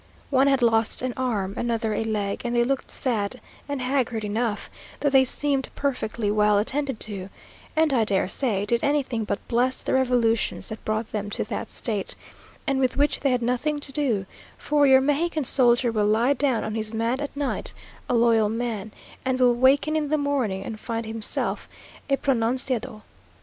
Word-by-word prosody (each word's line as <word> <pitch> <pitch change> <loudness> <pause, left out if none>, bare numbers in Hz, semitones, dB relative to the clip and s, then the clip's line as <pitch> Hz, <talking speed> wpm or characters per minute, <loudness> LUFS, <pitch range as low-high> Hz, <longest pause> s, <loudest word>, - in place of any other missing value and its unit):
One 270 0 +4
had 270 -2 +3
lost 225 0 +2
an 255 -1 -1
arm, 215 -7 -1
another 230 -2 -1
a 210 - -1
leg, 210 -3 -2
and 240 0 -2
they 240 - +4
looked 270 +2 -2
sad 235 -2 -2 0.3
and 280 -3 -2
haggard 250 -4 0
enough, 215 +1 -2 0.3
though 285 - +1
they 265 -1 +6
seemed 275 +1 0
perfectly 235 -6 -1
well 210 0 +3
attended 265 +3 -1
to, 195 -3 -4 0.5
and, 315 -2 +3
I 235 -4 +3
dare 200 -4 +1
say, 205 -2 +1
did 235 +3 +1
anything 270 -6 0
but 200 - -4
bless 250 +2 +1
the - - -1
revolutions 245 -4 +1
that 220 - -7
brought 215 +1 -2
them 205 -1 -3
to - - -2
that 210 0 -5
state, 210 -5 -2 0.5
and 275 -3 0
with 255 -2 +1
which 290 +1 +2
they 280 - +1
had 250 -2 +1
nothing 250 +5 0
to 285 - -2
do; 255 -9 0 0.3
for 290 -1 +2
your 265 0 +7
Mexican 305 +3 0
soldier 240 -1 +4
will 210 -2 +1
lie 230 +6 +3
down 270 -4 0
on 215 - -3
his 220 0 -2
mat 230 +4 0
at 285 -1 -5
night, 285 -2 -2 0.4
a 245 - +2
loyal 230 -2 +4
man, 220 -2 -3 0.3
and 260 0 0
will 250 -1 +5
waken 270 +5 +3
in 305 -1 0
the 305 +2 +1
morning 265 -10 -1
and 215 +1 -6
find 230 0 -4
himself 220 0 -2 0.4
a 275 - +3
pronunciado. 250 -3 -1
240 Hz, 185 wpm, -25 LUFS, 220-270 Hz, 0.5 s, your